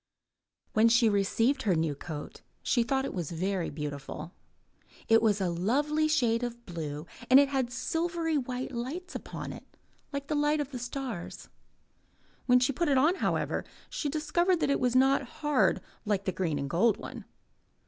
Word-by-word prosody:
When 225 +1 +5
she 235 -1 +5
received 225 +7 +2
her 195 -7 +2
new 160 -2 +1
coat 150 +1 -8 0.2
she 240 - +2
thought 265 +3 0
it - - -4
was 175 -6 -3
very 180 +1 -1
beautiful. 150 +2 -6 0.8
It 225 0 +6
was 210 -2 +3
a 185 -3 0
lovely 290 - +1
shade 245 -7 +2
of 240 -1 -5
blue 155 -3 -5 0.2
and 260 +2 +9
it 280 -1 +4
had 265 -3 -1
silvery 325 +6 -1
white 255 -2 -2
lights 270 +10 -5
upon - - -6
it - - -11 0.4
like 280 -1 -4
the 305 - -2
light 295 +1 +2
of 290 -1 -3
the 250 - -5
stars. 245 -6 -5 1.0
When 250 0 +6
she 255 +3 +1
put 335 +4 0
it 275 - +4
on, 315 +8 +4
however, - - 0 0.3
she 295 - -2
discovered 320 +5 +1
that - - +2
it - - +2
was 250 -1 +1
not 270 +1 +5 0.2
hard 295 -3 +3 0.2
like 205 -2 -1
the 190 - +1
green 170 -5 -1
and 140 0 -2
gold 195 +9 +3
one. - - -8
245 Hz, 175 wpm, -29 LUFS, 190-280 Hz, 1.0 s, and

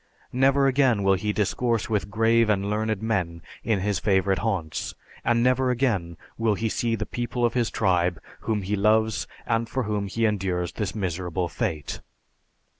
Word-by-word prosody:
Never 135 +2 +4
again 130 -6 +3
will 95 0 +4
he 105 +3 0
discourse 110 +2 0
with 105 -2 -1
grave 115 +1 +3
and 100 -1 +1
learned 110 -1 -1
men 90 -7 -1 0.2
in 110 -5 +1
his 100 -2 0
favorite 95 -2 +2
haunts, 90 -9 -2 0.3
and 115 0 +2
never 130 +1 +3
again 110 -10 0 0.2
will 115 -2 +2
he 110 +2 -1
see 115 +1 0
the 110 0 -3
people 120 +1 -2
of 120 - +1
his 120 -3 +1
tribe 90 -4 +1 0.2
whom 105 -3 -2
he 100 +3 -1
loves 110 +2 +2 0.2
and 115 0 0
for 130 +1 -1
whom 105 -2 -2
he 115 +4 0
endures 95 -4 0
this 105 -1 -4
miserable 90 -2 -2
fate. 75 -1 -3
105 Hz, 170 wpm, -25 LUFS, 95-115 Hz, 0.3 s, Never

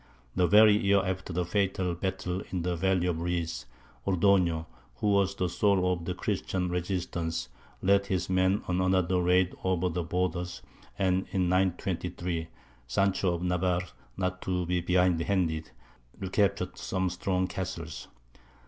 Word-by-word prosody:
The 90 -1 +3
very 105 +1 +7
year 100 -1 +3
after 95 0 -3
the 90 +1 -1
fatal 95 -1 0
battle 95 0 -3
in 90 -3 -2
the 90 0 0
Valley 95 +1 +1
of 85 -2 -1
Reeds, 85 -1 -2 0.4
Ordoño, 90 -3 +3 0.3
who 105 - 0
was 100 -1 +2
the 90 - 0
soul 90 0 +2
of 85 -2 -5
the 90 +1 -2
Christian 95 -2 -2
resistance, 85 -6 -2 0.3
led 100 +1 +3
his 95 -2 -1
men 95 +2 +2
on 90 0 +1
another 95 -1 +2
raid 90 +1 +3
over 90 -1 +1
the 90 +1 -2
borders; 90 +1 -2 0.3
and 95 0 +1
in 90 -2 0
923 90 -2 -1 0.4
Sancho 95 +5 +1
of 85 - -5
Navarre, 90 0 +1 0.3
not 90 -1 -2
to 90 -1 -1
be 90 +1 0
behindhand, 90 -2 +1 0.5
recaptured 95 0 0
some 95 0 -1
strong 90 +1 0
castles. 85 -5 -5
90 Hz, 140 wpm, -29 LUFS, 90-95 Hz, 0.5 s, very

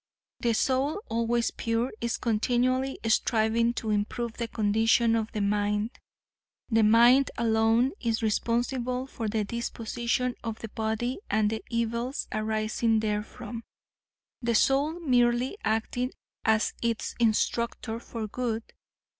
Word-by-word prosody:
The 235 -1 +1
soul, 265 - +1
always 230 +1 +1
pure, 230 +2 -1
is 235 0 -1
continually 250 +4 +1
striving 225 +1 +2
to 220 -2 -2
improve 220 +3 -1
the 235 0 -4
condition 225 +2 +2
of 220 -1 -1
the 210 - -2
mind. 205 +2 0 0.8
The 225 0 +4
mind 235 +5 +6
alone 225 +2 +3
is 230 -1 -1
responsible 245 +3 0
for 230 -4 -5
the 215 0 0
disposition 235 +2 -2
of 225 -1 -4
the 225 - -7
body 220 - -2
and 215 -1 +2
the 220 - -3
evils 235 +3 -2
arising 215 +1 0
therefrom, 215 +2 -4 0.8
the 235 -1 0
soul 285 +8 +2
merely 245 -1 +2
acting 225 +3 -1 0.3
as 220 0 +2
its 230 -1 -1
instructor 230 0 0
for 230 -2 -6
good. 230 0 -2
230 Hz, 120 wpm, -28 LUFS, 220-240 Hz, 0.8 s, mind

